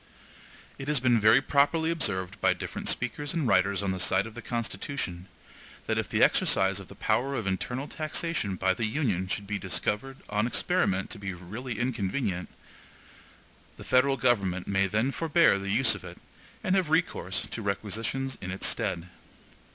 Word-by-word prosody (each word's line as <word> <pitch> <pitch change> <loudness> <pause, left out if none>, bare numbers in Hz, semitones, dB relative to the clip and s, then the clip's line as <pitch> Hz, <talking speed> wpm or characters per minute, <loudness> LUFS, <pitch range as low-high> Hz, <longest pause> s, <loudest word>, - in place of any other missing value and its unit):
It 135 - -6
has 150 -2 +3
been 120 -2 +3
very 110 +5 +6
properly 155 +4 +2
observed 100 - 0
by - - +3
different - - -4
speakers 145 +4 -1
and 155 -6 0
writers 100 -1 +2
on 100 - 0
the 95 - -3
side 95 +2 +2
of 115 - -9
the 120 - -8
Constitution, 110 -5 -4 0.6
that - - 0
if - - -3
the - - +3
exercise 95 0 +3
of 95 - -10
the - - -13
power 135 +3 0
of 110 - -3
internal 125 +8 -2
taxation 155 - -2
by 95 +1 +2
the 110 +3 -1
Union 110 - -1
should 100 +2 -3
be 100 0 -3
discovered 105 +7 -2
on 105 +2 0
experiment 125 - +1
to 110 - -4
be 95 -2 -4
really 110 +8 -6
inconvenient, 105 -5 -2 1.3
the - - -9
federal 135 +2 +3
government 95 -7 +1
may 95 0 +2
then 110 +7 0
forbear 165 - +3
the 100 0 -5
use 115 +3 +5
of - - -6
it, - - -9 0.5
and 185 - +2
have 185 -5 +1
recourse 160 - 0
to 115 - -4
requisitions 110 +6 -2
in 95 - -5
its 95 +1 -3
stead. 85 +1 -1
110 Hz, 175 wpm, -28 LUFS, 95-135 Hz, 1.3 s, very